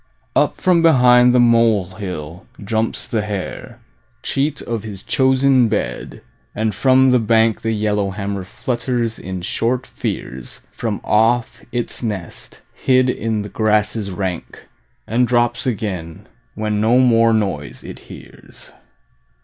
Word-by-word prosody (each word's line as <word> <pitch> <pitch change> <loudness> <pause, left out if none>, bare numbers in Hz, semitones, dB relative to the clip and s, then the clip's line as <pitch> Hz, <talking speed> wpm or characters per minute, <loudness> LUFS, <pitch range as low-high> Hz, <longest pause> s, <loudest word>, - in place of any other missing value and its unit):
Up - - +2
from 180 -2 +3
behind 125 -6 +6
the 125 - +3
molehill 95 -8 0 0.2
jumps 110 +2 -2
the 110 - -1
hare, 105 -3 -6 0.5
Cheat 145 +2 -1
of 115 -2 -3
his 100 -3 -8
chosen 130 -1 +3
bed, 65 - -4 0.3
and 110 0 -1
from 130 +4 +4
the 125 - +4
bank 115 0 +2
The 115 - -1
yellowhammer 100 -2 -2
flutters 120 +1 -3
in 95 -1 -6
short 125 +7 -1
fears 65 -1 -6
From 110 -3 -4
off 115 +2 +1
its 120 -1 -4
nest 100 -7 -6
hid 130 -1 +2
in 110 -3 -2
the 105 - -8
grasses 105 -1 0
rank, 95 -2 -5 0.4
And 120 +3 +1
drops 120 +3 +1
again 100 -5 -4 0.3
when 105 -1 -1
no 115 +3 +4
more 115 -3 +4
noise 95 -10 -2
it - - -9
hears. - - -13
110 Hz, 125 wpm, -19 LUFS, 100-125 Hz, 0.5 s, behind